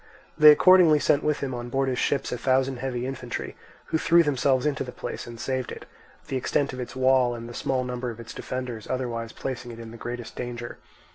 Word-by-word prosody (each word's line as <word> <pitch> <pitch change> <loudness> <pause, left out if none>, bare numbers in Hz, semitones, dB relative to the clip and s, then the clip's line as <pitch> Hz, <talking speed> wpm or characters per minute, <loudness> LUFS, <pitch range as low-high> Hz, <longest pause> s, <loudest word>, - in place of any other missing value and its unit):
They 150 0 +9
accordingly 170 0 +7
sent 145 0 +2
with 150 -1 0
him 135 -2 -2
on 120 0 -5
board 135 +2 0
his 125 -1 -1
ships 140 - 0
a 125 - -2
thousand 130 +1 +1
heavy 125 -1 -3
infantry, 130 -2 -5 0.4
who 160 - +3
threw 170 +1 +5
themselves 135 -2 +1
into 150 -3 0
the 125 - -7
place - - -6
and 120 -1 -9
saved 130 +1 -2
it; - - -8 0.4
the 135 - -2
extent 135 +2 0
of 130 - -7
its 125 - -6
wall 130 -2 +3
and 115 0 -7
the 120 - -9
small 130 +1 -1
number 125 0 -4
of 115 -1 -8
its 115 0 -9
defenders 125 -4 -5
otherwise 120 -3 -3
placing 130 -2 -5
it 115 -1 -9
in 115 -1 -9
the 115 - -10
greatest 120 0 -6
danger. 120 -1 -6
130 Hz, 220 wpm, -26 LUFS, 120-135 Hz, 0.4 s, They